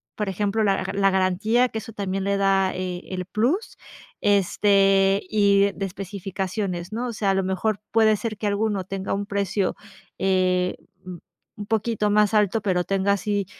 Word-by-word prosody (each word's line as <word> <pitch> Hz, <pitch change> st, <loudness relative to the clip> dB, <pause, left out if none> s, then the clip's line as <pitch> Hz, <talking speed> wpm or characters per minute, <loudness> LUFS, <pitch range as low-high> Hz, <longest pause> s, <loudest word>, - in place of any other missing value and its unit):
por 210 Hz, -2 st, -2 dB
ejemplo, 205 Hz, +3 st, 0 dB
la 195 Hz, -2 st, +1 dB
ga 190 Hz, -, -4 dB
la 195 Hz, 0 st, +3 dB
garantía 200 Hz, +7 st, +2 dB
que 225 Hz, -, -5 dB
eso 225 Hz, +1 st, -10 dB
también 195 Hz, -2 st, -3 dB
le 200 Hz, 0 st, +1 dB
da, 195 Hz, -1 st, +2 dB
eh, 180 Hz, -1 st, -4 dB
el 185 Hz, -1 st, -4 dB
plus, 245 Hz, -, -1 dB, 0.4 s
este, 195 Hz, 0 st, +3 dB
y 200 Hz, -1 st, +3 dB
de 195 Hz, -, -4 dB
especificaciones, 190 Hz, -1 st, -4 dB
¿no?, 240 Hz, +3 st, -2 dB
o 235 Hz, -, -4 dB
sea, 205 Hz, -2 st, 0 dB
a -, -, +2 dB
lo 195 Hz, -, +1 dB
mejor 190 Hz, +3 st, -1 dB
puede 220 Hz, -1 st, +4 dB
ser 215 Hz, -1 st, -4 dB
que 210 Hz, -, -5 dB
alguno 205 Hz, -1 st, 0 dB
tenga 195 Hz, 0 st, -4 dB
un 200 Hz, +1 st, -3 dB
precio, 200 Hz, -1 st, -1 dB, 0.4 s
eh, 185 Hz, -1 st, +1 dB, 0.3 s
un-un 185 Hz, +3 st, -12 dB
poquito 220 Hz, -1 st, 0 dB
más 210 Hz, 0 st, +3 dB
alto, 210 Hz, +1 st, +2 dB
pero 180 Hz, -3 st, 0 dB
tenga 195 Hz, 0 st, +1 dB
así 200 Hz, -1 st, -1 dB
200 Hz, 170 wpm, -23 LUFS, 190-210 Hz, 0.4 s, puede